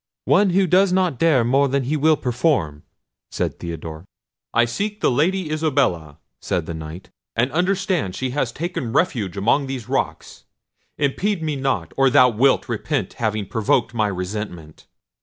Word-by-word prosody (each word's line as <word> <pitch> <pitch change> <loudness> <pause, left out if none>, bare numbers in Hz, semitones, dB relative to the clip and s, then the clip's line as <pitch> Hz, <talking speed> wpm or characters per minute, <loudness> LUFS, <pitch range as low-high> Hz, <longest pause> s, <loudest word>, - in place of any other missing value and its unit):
"One 205 - +4
who 190 +2 +3
does 185 +2 +4
not 180 -7 +1
dare 155 -7 +4
more 135 +4 +3
than 135 0 0
he 140 +5 -1
will 155 +1 +3
perform," 120 - 0 0.5
said - - -3
Theodore. 80 -1 -7 0.5
"I 120 - +3
seek 205 - -3
the - - +2
Lady 165 +5 0
Isabella," 130 - 0 0.2
said 85 - -2
the 85 - -5
Knight, 80 +3 -9 0.2
"and 120 +4 +1
understand 180 - 0
she 130 +3 -3
has 130 -3 -1
taken 135 -6 -4
refuge 115 - 0
among 125 +8 +2
these 130 -5 -5
rocks. - - -3 0.5
Impede 170 +6 0
me 155 -2 -1
not, 130 - -2
or 135 0 +5
thou 125 0 +6
wilt 125 +4 +2
repent - - -2
having 110 -2 0
provoked 115 +4 0
my 110 -2 +1
resentment." 90 -4 -6
130 Hz, 160 wpm, -21 LUFS, 100-155 Hz, 0.5 s, thou